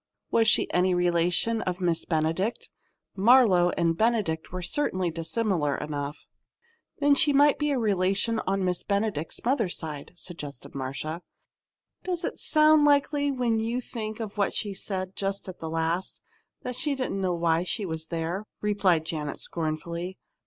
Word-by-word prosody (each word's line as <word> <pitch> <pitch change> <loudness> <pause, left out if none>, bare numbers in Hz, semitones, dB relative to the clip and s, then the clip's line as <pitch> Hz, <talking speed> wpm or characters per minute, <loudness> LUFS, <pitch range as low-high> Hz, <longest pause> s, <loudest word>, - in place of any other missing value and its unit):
Was 225 -1 +4
she - - +4
any 180 0 +3
relation 175 +6 +2
of 180 0 -3
Miss 170 -3 0
Benedict? 165 +7 -1 0.4
"Marlowe" 200 -4 +5
and 165 -1 +2
"Benedict" 210 -7 0
were 185 0 -4
certainly 185 - 0
dissimilar 165 -2 0
enough. 145 0 -5 0.7
"But 290 - -3
then 290 - +7
she 290 +1 +3
might 290 +1 +5
be 295 0 +1
a 280 - +1
relation 205 +1 +1
on 195 0 +1
Miss 180 -1 0
Benedict's 200 -6 -2
mother's 235 -8 +1
side," 150 -2 -6
suggested 150 -7 -8
Marcia. 140 +5 -4 0.8
"Does 355 -2 -2
it - - -4
sound 305 -1 +5
likely 285 0 +3
when 245 -4 +1
you 230 +3 -1
think 220 -3 -5
what 210 -3 -2
she 205 -2 -1
said 190 -1 -4
just 195 0 -3
at 185 - -8
the 160 - -5
last 165 +3 -2 0.4
that 250 0 -4
she 280 +3 0
didn't 255 -7 -2
know 180 -2 +1
why 170 0 +2
she 200 +3 -2
was 160 -2 -4
there?" 170 +5 -3
replied 195 -6 +2
Janet, 150 -3 -4
scornfully. 170 +3 -4
185 Hz, 155 wpm, -27 LUFS, 165-230 Hz, 0.8 s, then